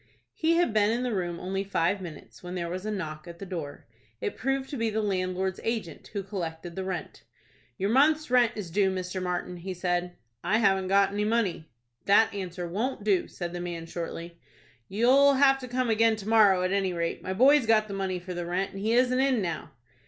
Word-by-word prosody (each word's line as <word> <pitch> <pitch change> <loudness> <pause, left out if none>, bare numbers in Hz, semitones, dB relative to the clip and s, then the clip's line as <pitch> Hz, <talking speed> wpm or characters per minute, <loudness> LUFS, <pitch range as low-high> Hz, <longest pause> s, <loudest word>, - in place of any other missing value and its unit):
He 330 +1 +1
had 345 -9 +2
been 210 -1 +3
in 235 +3 0
the 250 -2 -1
room 175 -3 -2
only 195 +1 -2
five 195 0 0
minutes, 165 -5 -10
when 180 0 -7
there 170 -1 -3
was 185 +3 -4
a - - -1
knock 160 -5 -5
at 170 0 -9
the 195 - -7
door. 165 -6 -6 0.3
It - - -3
proved 270 0 -1
to - - -3
be 230 -1 0
the 220 0 -1
landlord's 190 -2 -1
agent, 225 -7 -3
who 200 -2 -4
collected 170 -3 -5
the 190 - -3
rent. 185 -3 -5 0.6
"Your 195 +2 0
month's 300 +2 +3
rent 245 -2 +4
is 195 -6 -6
due, 195 +1 +3
Mr. 185 0 -3
Martin," 180 0 -3
he 185 +2 -6
said. 175 0 -1 0.3
"I 200 +5 +2
haven't 195 -4 +2
got 195 0 +3
any 205 +1 0
money." 210 -7 0 0.4
"That 205 +3 +5
answer 180 -3 -5
won't 215 +6 -2
do," 200 -4 +2
said 175 -1 -6
the 175 - -4
man, 170 -2 -5
shortly. 170 0 -6 0.5
"You'll 265 +7 +4
have 270 0 +5
to 255 - -7
come 250 -1 0
again 225 0 +4
to 210 -1 -9
morrow, 205 -5 +5
at 185 - 0
any 195 -2 +1
rate. 170 -1 -2
My 185 - -3
boy's 265 +4 +5
got 215 -1 +4
the 200 - -6
money 190 -1 -2
for 180 +1 -7
the 175 -1 -4
rent, 185 +3 -1
and 195 - -8
he 220 +3 0
isn't 255 +1 +3
in 265 -2 +3
now." 170 -6 -3
195 Hz, 220 wpm, -27 LUFS, 180-225 Hz, 0.6 s, That